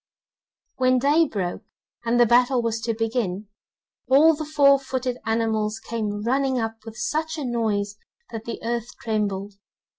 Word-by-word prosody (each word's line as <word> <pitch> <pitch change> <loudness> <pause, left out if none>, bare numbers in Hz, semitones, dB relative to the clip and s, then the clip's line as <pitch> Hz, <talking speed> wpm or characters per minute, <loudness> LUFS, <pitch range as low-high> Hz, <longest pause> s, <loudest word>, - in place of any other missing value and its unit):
When 255 0 +3
day 295 +5 +3
broke, 185 -8 -3 0.4
and 235 +1 +2
the 240 - +7
battle 245 +1 +3
was 230 -1 -1
to 230 0 -1
begin, 220 -3 -2 0.6
all 290 +5 +6
the 310 0 -4
four 280 -2 +5
footed 255 -2 -3
animals 220 -1 0
came 215 -2 -4
running 265 +2 +1
up 225 -1 -3
with 220 -1 -9
such 315 +7 -2
a 295 - -3
noise 210 -4 -1 0.3
that 225 -1 -6
the 235 - -5
earth 235 0 -2
trembled. 205 -3 -2
230 Hz, 150 wpm, -24 LUFS, 220-260 Hz, 0.6 s, the